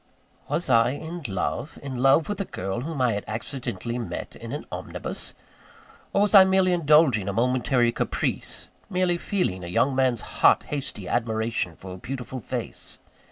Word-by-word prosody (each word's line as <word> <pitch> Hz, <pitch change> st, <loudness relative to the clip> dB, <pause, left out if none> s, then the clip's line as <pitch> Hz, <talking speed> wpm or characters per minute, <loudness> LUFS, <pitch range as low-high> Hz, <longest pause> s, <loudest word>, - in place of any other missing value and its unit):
Was 160 Hz, +5 st, -1 dB
I 120 Hz, 0 st, +4 dB
in 165 Hz, +4 st, -6 dB
love? 110 Hz, -, -3 dB
in 135 Hz, -2 st, -5 dB
love 135 Hz, +5 st, +4 dB
with 205 Hz, -1 st, -2 dB
a -, -, -2 dB
girl 95 Hz, -, -4 dB
whom 155 Hz, +1 st, -4 dB
I 125 Hz, -3 st, +3 dB
had 100 Hz, -, -3 dB
accidentally 115 Hz, 0 st, -4 dB
met 115 Hz, -, -5 dB
in -, -, -8 dB
an -, -, -5 dB
omnibus? -, -, -5 dB, 0.8 s
Or, 200 Hz, -, +3 dB
was 210 Hz, -, +1 dB
I 195 Hz, -2 st, +11 dB
merely 190 Hz, -1 st, +3 dB
indulging 150 Hz, -, +4 dB
a -, -, -2 dB
momentary 125 Hz, +1 st, +2 dB
caprice -, -, -2 dB, 0.2 s
merely 180 Hz, -2 st, +1 dB
feeling 135 Hz, -, -1 dB
a -, -, -5 dB
young 130 Hz, +10 st, +2 dB
man's 130 Hz, -3 st, +2 dB, 0.2 s
hot, -, -, +6 dB
hasty 130 Hz, -9 st, -4 dB
admiration 110 Hz, -6 st, -1 dB
for 95 Hz, +2 st, -9 dB
a -, -, -8 dB
beautiful 130 Hz, +4 st, -5 dB
face? 110 Hz, -, -6 dB
130 Hz, 165 wpm, -25 LUFS, 115-160 Hz, 0.8 s, I